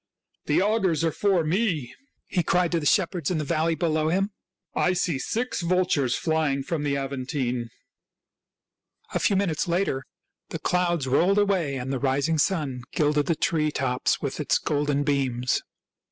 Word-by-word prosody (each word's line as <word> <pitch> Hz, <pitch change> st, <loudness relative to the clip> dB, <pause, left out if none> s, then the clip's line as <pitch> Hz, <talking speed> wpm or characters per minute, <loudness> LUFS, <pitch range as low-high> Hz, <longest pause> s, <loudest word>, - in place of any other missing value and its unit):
" -, -, -50 dB
The 150 Hz, +5 st, +3 dB
augurs 195 Hz, -7 st, +1 dB
are 165 Hz, -, +2 dB
for 190 Hz, -1 st, +2 dB
me," 160 Hz, -, 0 dB, 0.3 s
he 180 Hz, -, 0 dB
cried 175 Hz, +1 st, +1 dB
to 170 Hz, -, +1 dB
the 150 Hz, -, -1 dB
shep 190 Hz, -1 st, +3 dB
herds 170 Hz, -6 st, -2 dB
in 180 Hz, -, 0 dB
the 155 Hz, -, -1 dB
valley 160 Hz, +3 st, +1 dB
below 155 Hz, -2 st, 0 dB
him. 195 Hz, +4 st, +1 dB, 0.2 s
" -, -, -59 dB, 0.2 s
I -, -, +2 dB
see 175 Hz, -6 st, 0 dB
six 235 Hz, -, -2 dB
vultures 170 Hz, -8 st, +1 dB
flying 155 Hz, -4 st, 0 dB
from 160 Hz, +1 st, -2 dB
the 140 Hz, -1 st, 0 dB
Aventine." 130 Hz, -3 st, -3 dB, 1.4 s
A -, -, +1 dB
few 200 Hz, -, +2 dB
minutes 190 Hz, -5 st, 0 dB
later 170 Hz, -6 st, 0 dB, 0.5 s
the -, -, -4 dB
clouds 175 Hz, -4 st, 0 dB
rolled 175 Hz, +10 st, +3 dB
away 190 Hz, -9 st, +1 dB
and 130 Hz, +1 st, -3 dB
the 135 Hz, -, -1 dB
rising 140 Hz, +4 st, +1 dB
sun 150 Hz, -7 st, 0 dB
gilded 150 Hz, -1 st, +1 dB
the 165 Hz, -, +2 dB
tree 155 Hz, -1 st, +1 dB
tops 130 Hz, -4 st, 0 dB
with -, -, -4 dB
its -, -, +2 dB
golden 145 Hz, -1 st, 0 dB
beams. 130 Hz, -4 st, 0 dB
155 Hz, 170 wpm, -25 LUFS, 140-180 Hz, 1.4 s, The